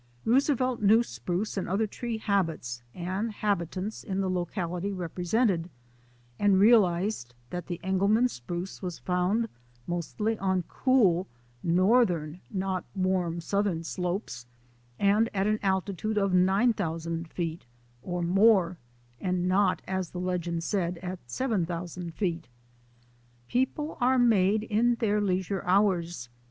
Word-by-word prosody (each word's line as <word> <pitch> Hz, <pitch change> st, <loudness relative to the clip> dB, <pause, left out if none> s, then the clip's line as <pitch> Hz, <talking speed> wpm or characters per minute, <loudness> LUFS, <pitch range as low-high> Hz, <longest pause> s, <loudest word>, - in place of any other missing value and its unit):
Roosevelt 255 Hz, 0 st, +2 dB
knew 220 Hz, +3 st, +5 dB
spruce 175 Hz, -, -3 dB
and 190 Hz, -, -2 dB
other 200 Hz, +4 st, +1 dB
tree 230 Hz, +2 st, -4 dB
habits 165 Hz, -, -1 dB
and 185 Hz, +6 st, -2 dB
habitats 200 Hz, 0 st, -2 dB
in 190 Hz, 0 st, -3 dB
the 190 Hz, -1 st, 0 dB
locality 180 Hz, +1 st, -2 dB
represented, 180 Hz, +1 st, 0 dB, 0.7 s
and 200 Hz, -2 st, +4 dB
realized 195 Hz, -, +3 dB, 0.2 s
that 180 Hz, -1 st, -5 dB
the 175 Hz, -1 st, -4 dB
Engelmann 200 Hz, +6 st, +3 dB
spruce 175 Hz, -, -6 dB
was 180 Hz, -3 st, -4 dB
found 185 Hz, +6 st, 0 dB, 0.4 s
mostly 210 Hz, +6 st, -2 dB
on 190 Hz, -1 st, +1 dB
cool 195 Hz, -7 st, +2 dB, 0.3 s
northern 180 Hz, -3 st, +2 dB
not 190 Hz, -3 st, -2 dB
warm 185 Hz, -3 st, 0 dB
southern 200 Hz, -2 st, 0 dB
slopes 175 Hz, -, -4 dB, 0.5 s
and 210 Hz, -, +3 dB
at 195 Hz, 0 st, +1 dB
an 215 Hz, +1 st, +1 dB
altitude 195 Hz, +2 st, -1 dB
of 195 Hz, -2 st, +2 dB
9,000 180 Hz, -4 st, +1 dB
feet 165 Hz, -4 st, -4 dB, 0.3 s
or 175 Hz, +5 st, -3 dB
more, 185 Hz, -1 st, +4 dB, 0.4 s
and 180 Hz, -1 st, -1 dB
not' 195 Hz, +2 st, +2 dB
as 190 Hz, -2 st, -2 dB
the 180 Hz, -, -6 dB
legend 175 Hz, -2 st, -2 dB
said, 180 Hz, -2 st, -1 dB
at 180 Hz, 0 st, -4 dB
7,000 175 Hz, -, -2 dB
feet. 170 Hz, -5 st, -2 dB, 1.0 s
People 265 Hz, -, -1 dB
are 255 Hz, +1 st, +4 dB
made 215 Hz, -3 st, +4 dB
in 230 Hz, +3 st, +2 dB
their 210 Hz, -3 st, +1 dB
leisure 190 Hz, -1 st, -1 dB
hours. 180 Hz, -7 st, +1 dB
190 Hz, 120 wpm, -28 LUFS, 175-210 Hz, 1.0 s, knew